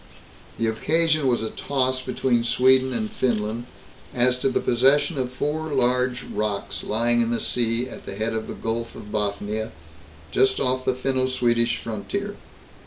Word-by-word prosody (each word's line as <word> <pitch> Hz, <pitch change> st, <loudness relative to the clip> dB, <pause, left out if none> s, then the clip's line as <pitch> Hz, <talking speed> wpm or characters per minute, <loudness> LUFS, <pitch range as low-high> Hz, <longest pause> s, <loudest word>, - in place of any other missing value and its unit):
The 115 Hz, -, 0 dB
occasion 155 Hz, +6 st, +2 dB
was 120 Hz, -3 st, +2 dB
a 110 Hz, -, -3 dB
toss 130 Hz, -2 st, -1 dB
between 125 Hz, -2 st, +1 dB
Sweden 130 Hz, +2 st, +4 dB
and 220 Hz, -, -1 dB
Finland 120 Hz, -, -1 dB, 0.5 s
as 125 Hz, +1 st, +3 dB
to 135 Hz, -, +2 dB
the 130 Hz, -, +1 dB
possession 140 Hz, +5 st, +3 dB
of 125 Hz, -1 st, -2 dB
four 150 Hz, +4 st, -2 dB
large 125 Hz, -1 st, +2 dB
rocks 105 Hz, -2 st, -3 dB
lying 120 Hz, +2 st, +2 dB
in 115 Hz, -, +1 dB
the 120 Hz, -, 0 dB
sea 120 Hz, 0 st, 0 dB
at -, -, -10 dB
the 95 Hz, -, -5 dB
head 110 Hz, +2 st, -1 dB
of 110 Hz, -1 st, -3 dB
the -, -, -6 dB
Gulf 115 Hz, +1 st, -3 dB
of 105 Hz, -, -10 dB
Bothnia, 105 Hz, +1 st, -2 dB, 0.6 s
just 400 Hz, 0 st, +3 dB
off 130 Hz, 0 st, 0 dB
the 130 Hz, -, +2 dB
Finno 130 Hz, 0 st, 0 dB
Swedish 120 Hz, -2 st, +2 dB
frontier. 200 Hz, -, -4 dB
125 Hz, 165 wpm, -24 LUFS, 115-130 Hz, 0.6 s, Sweden